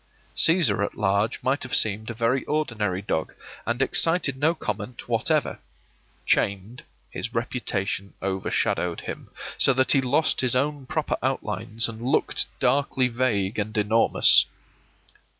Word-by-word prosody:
Cæsar 165 - +3
at - - -4
large 100 +1 +1
might 135 +3 0
have - - -2
seemed 110 +1 +2
a 115 - -5
very 120 +3 0
ordinary 110 -11 -2
dog, 80 -5 -3 0.3
and 120 +3 +1
excited 165 0 +2
no 155 +5 +1
comment 105 - -6
whatever; - - 0 0.7
chained, 100 +5 0 0.3
his 115 +1 -5
reputation 100 -5 -3
overshadowed 95 -2 -1
him, - - -8 0.3
so 135 - +5
that 130 +1 +2
he 135 - +4
lost 140 +5 +1
his 125 -1 +2
own 140 0 -1
proper 155 +1 -2
outlines 115 -3 -1
and 115 0 -8
looked 125 +3 0
darkly 130 0 +1
vague 115 -5 -1
and 110 +1 -3
enormous. 110 +2 +5
115 Hz, 135 wpm, -24 LUFS, 105-135 Hz, 0.7 s, so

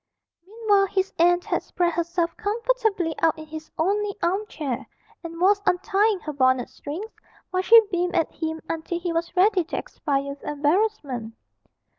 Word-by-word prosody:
Meanwhile 415 -2 +2
his 380 0 -1
aunt 350 +1 +4
had - - 0
spread 345 -1 -1
herself 340 0 -1
comfortably 440 -5 0
out 325 -1 +3
in 315 - -8
his 315 0 -9
only 405 +4 0
arm 385 +5 0
chair, 270 - -4 0.4
and 335 0 -7
was 400 +3 +4
untying 400 +3 +2
her 305 - -5
bonnet 260 -2 +2
strings, 360 +10 -7 0.4
while 370 0 +1
she 455 +4 +8
beamed 355 0 0
at 330 -2 +1
him 320 -1 -4
until 330 +1 -3
he 345 -1 -2
was 335 +2 -2
ready 375 0 +4
to - - -4
expire 280 -2 -2
with 280 0 -8
embarrassment. 295 - -1
350 Hz, 160 wpm, -24 LUFS, 315-400 Hz, 0.4 s, she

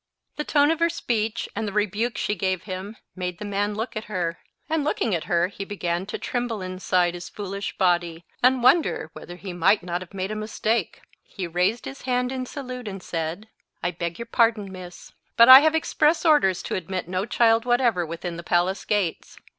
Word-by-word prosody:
The 300 - -1
tone 290 0 +3
of 325 - -1
her 335 0 +3
speech, 225 -8 -2
and 220 +1 -2
the - - -3
rebuke 210 +3 -1
she 210 - 0
gave 185 -2 -1
him, 195 +2 -6 0.2
made 180 -2 -4
the 210 - -7
man 205 +1 -1
look 225 +4 -4
at 215 - -4
her; 175 -5 -3 0.3
and 315 -1 0
looking 235 -7 0
at 165 - -1
her, 170 0 +2
he 200 +1 -7
began 185 -2 -3
to - - -4
tremble 240 -3 -3
inside 185 -1 0
his 175 0 -7
foolish 200 -1 -5
body, 175 -2 +1 0.2
and 250 0 +4
wonder 285 +7 +3
whether 175 - -9
he 185 0 -7
might 185 +3 +3
not 175 0 -3
have 185 +1 -11
made 190 +1 -3
a - - -3
mistake. 215 -1 -2 0.2
He 190 - -6
raised 180 +7 0
his 270 - -8
hand 250 0 0
in 255 -1 -4
salute, 255 -4 -7
and 195 -2 -6
said— 165 +5 -4 0.4
"I 175 - +1
beg 170 -1 -4
your 235 - -6
pardon, 225 -4 +2
miss, 180 -1 -10 0.3
but 235 - +8
I 260 +1 +13
have 315 +2 +3
express 320 +1 +2
orders 240 - +4
to - - -4
admit 185 0 -3
no 185 +3 -2
child 230 -1 +3
whatever 240 -7 +2
within 170 +1 -5
the - - -5
palace 180 +3 0
gates. 200 -6 -1
200 Hz, 200 wpm, -24 LUFS, 180-235 Hz, 0.4 s, I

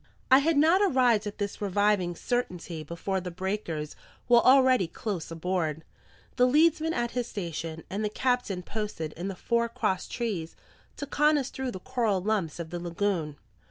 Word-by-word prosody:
I 260 - +9
had 310 +2 +2
not 325 +6 +5
arrived 250 - +3
at 205 - -6
this 205 0 -4
reviving 205 -3 +1
certainty 180 -8 -3
before 180 +4 -3
the 180 - -5
breakers 175 -4 -4 0.3
were 240 -1 +7
already 255 -6 +5
close 185 -1 -4
aboard, 165 -2 -2 0.5
the 250 0 +5
leadsman 315 +3 +3
at 240 0 -1
his 245 -1 -2
station, 165 -4 -5
and 205 +3 -3
the 210 - 0
captain 240 -5 -1
posted 205 -7 -4
in 175 +3 -5
the 195 - -4
fore 235 +4 0
cross 190 -4 -1
trees 200 -10 -3 0.4
to 285 - -4
con 300 +2 +3
us 275 -2 -2
through 265 -1 -3
the 190 - -6
coral 230 -3 0
lumps 185 -5 -1
of 165 -1 -6
the 175 - -4
lagoon. 170 -3 -2
205 Hz, 170 wpm, -28 LUFS, 175-250 Hz, 0.5 s, I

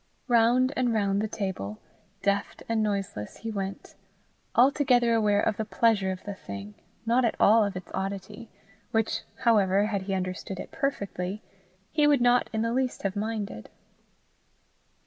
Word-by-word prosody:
Round 245 +2 +4
and 250 -2 +1
round 200 -1 +1
the 215 - -1
table, 190 - -4 0.5
deft 200 0 -1
and 225 -1 +1
noiseless, 195 - -3
he 225 - -5
went, 195 -2 -5 0.6
altogether 250 -2 +4
aware 210 -2 +3
of 215 - 0
the 220 - -1
pleasure 215 -3 +2
of 185 - -6
the 205 - -5
thing, 100 - -8 0.3
not 240 +3 +3
at 230 - +1
all 220 +2 +6
of 200 -2 -2
its 185 - -8
oddity 195 +4 -5 0.4
which, 225 -2 0 0.2
however, 205 -4 +4
had 205 -2 -1
he 195 0 -2
understood 185 0 -4
it - - -7
perfectly, 200 -7 -3 0.5
he 300 -1 +3
would 290 -2 +4
not 245 0 +3
in 220 -1 -1
the 230 0 0
least 255 0 -1
have 195 0 -1
minded. 205 - -4
210 Hz, 155 wpm, -27 LUFS, 195-235 Hz, 0.6 s, all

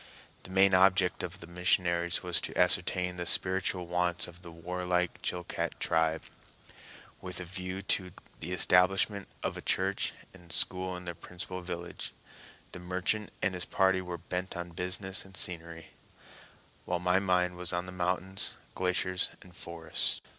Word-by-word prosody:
The - - -10
main 95 +1 +5
object 95 0 +5
of 90 +2 -5
the - - -7
missionaries 85 0 +2
was 90 -1 +1
to - - -4
ascertain 90 0 +3
the 90 - -3
spiritual 95 -1 +2
wants 90 0 0
of 90 0 -13
the 85 - -9
warlike 90 +1 -1
Chilcat 90 -1 -3
tribe, 80 0 +2 1.0
with 90 -1 -4
a 90 - -5
view 95 +2 -5
to 95 -1 +1 0.3
the 85 +3 -5
establishment 95 +2 +4 0.2
of - - -1
a - - -6
church - - +1 0.2
and 90 -3 -13
school 90 0 +1
in 90 - -9
their 85 - -3
principal 90 +2 -6
village; 85 -1 -6 0.6
the - - -7
merchant 95 +4 0
and 95 - +3
his 90 0 -1
party 95 -1 +3
were 90 -1 -5
bent 90 +2 -4
on 85 0 -5
business 90 +2 0
and 95 -1 -10
scenery; 85 -2 -3 1.0
while 90 - 0
my 90 +1 +3
mind 90 -2 +2
was 90 0 -2
on 90 0 -1
the 90 - -7
mountains, 90 +1 -1 0.2
glaciers, 90 0 +1
and 90 -1 -16
forests. 85 -2 -1
90 Hz, 155 wpm, -31 LUFS, 90-95 Hz, 1.0 s, main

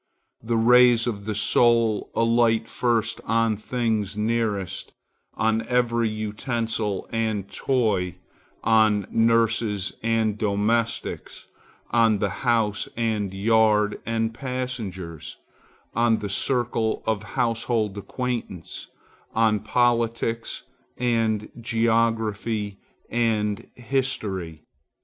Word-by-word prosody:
The 115 +1 -1
rays 120 0 +6
of 100 -5 -3
the 110 -1 -2
soul 115 0 +3
alight 115 -1 +3
first 115 -2 0
on 115 -1 +1
things 110 -2 -2
nearest, 105 -3 -2 0.4
on 110 0 +1
every 120 -2 +1
utensil 110 -1 -3
and 110 -3 -1
toy, 100 -5 0 0.5
on 110 -3 +3
nurses 115 -3 +2
and 110 -2 0
domestics, 110 +3 -1 0.5
on 115 -2 +4
the 100 -1 -1
house 115 -5 +1
and 110 -4 -1
yard 105 +1 +2
and 115 0 -1
passengers, 115 - -5 0.6
on 115 0 +3
the 105 - -5
circle 115 +1 0
of 110 -2 0 0.2
household 115 -3 0
acquaintance, 115 -5 -5 0.5
on 110 -1 +3
politics 115 -1 0 0.3
and 115 -3 0
geography 115 -3 0 0.3
and 110 -3 0
history. 110 - -3
115 Hz, 90 wpm, -24 LUFS, 105-115 Hz, 0.6 s, rays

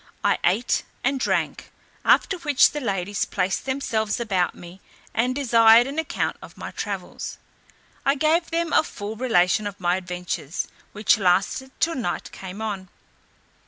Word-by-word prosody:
I - - +2
ate 210 +8 +2 0.2
and 270 +1 +1
drank; - - -1 0.3
after 380 - +3
which 295 -4 +4
the 295 - -4
ladies 200 -3 -1
placed 190 +3 -1
themselves 230 -6 -1
about 190 -7 0
me, 175 +2 -12 0.3
and 250 +3 +1
desired 230 -3 +6
an 280 +4 -3
account 320 - -2
of - - -13
my - - -6
travels. - - -5 0.7
I 275 +1 +3
gave 315 +4 +2
them 335 0 -1
a - - +6
full 215 -8 -6
relation 215 -3 +2
of 200 -1 -8
my 175 0 +1
adventures, 180 -4 -4 0.2
which 210 +1 +3
lasted 195 +8 +1
till 330 - +2
night 235 - -3
came 190 +3 -7
on. 195 -4 -4
220 Hz, 150 wpm, -24 LUFS, 190-270 Hz, 0.7 s, desired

